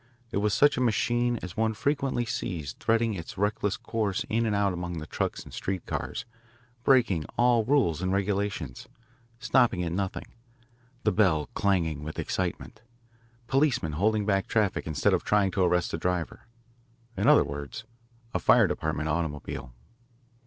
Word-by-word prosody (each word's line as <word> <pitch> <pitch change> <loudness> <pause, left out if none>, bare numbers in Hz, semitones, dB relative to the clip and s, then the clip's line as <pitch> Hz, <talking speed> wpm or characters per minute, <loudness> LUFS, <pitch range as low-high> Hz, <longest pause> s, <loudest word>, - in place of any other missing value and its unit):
It - - -1
was 105 +1 +1
such 145 -2 +4
a - - 0
machine 120 +1 +1
as 90 - -6
one 110 0 0
frequently 135 0 0
sees 80 - -4
threading 115 0 +2
its 95 +4 -7
reckless 105 0 0
course 105 -4 -2
in 115 +1 +1
and 105 - 0
out 100 -2 +2
among 90 -1 -4
the 75 - -5
trucks - - -3
and - - -13
street 95 -2 -3
cars, - - -4 0.6
breaking 115 - +3
all 120 -1 +4
rules 110 - +2
and 95 0 0
regulations, 100 -8 -2 0.5
stopping 120 -7 +2
at 85 - -2
nothing, 95 +2 -3 0.8
the 105 - +3
bell 90 -9 +2
clanging 85 -7 0
with 80 +1 -6
excitement, 95 +4 -3 0.6
policemen 135 - +1
holding 105 +7 +1
back 95 -2 +1
traffic 105 -7 0
instead 75 -4 +1
of - - +1
trying 100 -2 +2
to 95 - -1
arrest 90 -1 +2
the 80 - -3
driver 90 +2 -2 0.7
in 100 - 0
other - - +7
words, 70 +9 -6 0.5
a - - 0
Fire - - +5
Department 75 +2 -2
automobile. 75 -5 -3
100 Hz, 155 wpm, -28 LUFS, 85-115 Hz, 0.8 s, other